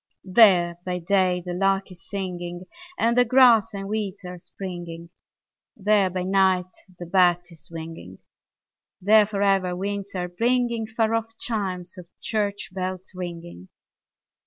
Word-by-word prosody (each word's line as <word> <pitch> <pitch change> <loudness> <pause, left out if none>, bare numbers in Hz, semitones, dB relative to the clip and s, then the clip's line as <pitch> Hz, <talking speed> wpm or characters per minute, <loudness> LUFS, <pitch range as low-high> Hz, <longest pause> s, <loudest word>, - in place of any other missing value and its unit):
There 185 -4 +5
by 180 -1 -3
day 180 0 +1
the 180 - -4
lark 195 +1 0
is 175 -2 -15
singing 175 -3 -5 0.3
And 235 +1 +2
the 245 - +6
grass 235 -3 +5
and 195 -2 -6
weeds 205 -2 -4
are 180 0 -8
springing; 170 -2 -8 0.7
There 205 -2 +3
by 185 0 -3
night 185 -1 +2 0.2
the 175 - -7
bat 175 0 +3
is 160 -3 -13
winging; 160 - -9 0.8
There 210 +2 +5
for 200 -1 -2
ever 190 -2 +2
winds 200 +1 -4
are 180 -1 -2
bringing 235 +3 0
Far 220 0 0
off 225 0 -3
chimes 185 -5 -4
of 175 - -12
church 205 -3 -2
bells 185 0 -5
ringing. 170 - -8
190 Hz, 140 wpm, -24 LUFS, 175-210 Hz, 0.8 s, the